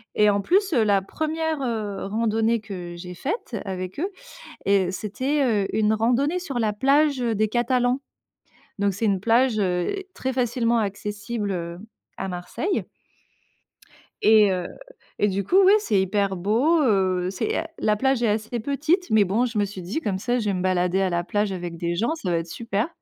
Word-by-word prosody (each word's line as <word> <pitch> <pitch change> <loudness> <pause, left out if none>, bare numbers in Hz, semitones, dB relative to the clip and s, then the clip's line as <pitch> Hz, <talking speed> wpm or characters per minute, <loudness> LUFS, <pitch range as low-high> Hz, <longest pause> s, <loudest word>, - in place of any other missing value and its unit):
Et 210 0 +5
en 200 0 +2
plus, 380 - +2
heu, 235 - +4
la 200 -2 +3
1re, 315 +6 -2
heu, 220 -6 -3
randonnée 225 +2 +1
que 180 -5 -7
j'ai 180 +1 -8
faite 325 - -4
avec 185 +3 -5
eux. 390 +3 -1 0.6
Heu, 195 -2 +3
c'était, 260 +9 -1 0.2
heu, - - -3
une 215 -1 +3
randonnée 250 +10 +1
sur 285 -8 -5
la 220 -2 +1
plage, 280 +4 +3
heu, 230 -2 0
des 215 +1 +1
Catalans. 245 +2 +1 0.8
Donc 200 -1 +1
c'est 225 - -1
une 195 -3 +2
plage, 230 +1 +3
heu, 180 - 0 0.2
très 260 0 -2
facilement 240 -2 +1
accessible, 205 +1 -3
heu, 170 -1 -4 0.4
à 195 - -3
Marseille. 180 - -2 1.4
Et, 215 -2 +6
heu, 180 -1 -2 0.5
et 205 - +3
du 200 0 -1
coup 365 - +2
oui, 390 - +7
c'est 215 - +1
hyper 195 +1 0
beau, 235 - +2
heu, 185 -6 +2
c'est, 425 - -2
heu - - -2 0.2
la 210 - +2
plage 265 +2 +1
est - - +3
assez 220 +3 -1
petite. 310 - 0
Mais 220 -1 +5
bon 215 +7 +1
je 235 -3 -4
me 205 - +2
suis 195 -1 -8
dit: 185 - -3
«Comme 195 -7 -2
ça 245 +4 0
je 220 - -3
vais 205 - +1
me 180 - -2
balader 185 0 +1
à 190 - +1
la 175 0 -1
plage 205 +2 -1
avec 175 -2 -5
des 170 +1 -2
gens, 230 - 0
ça 195 - -3
va 170 - +2
être 165 0 -3
super». 225 +3 -2
215 Hz, 195 wpm, -24 LUFS, 190-250 Hz, 1.4 s, oui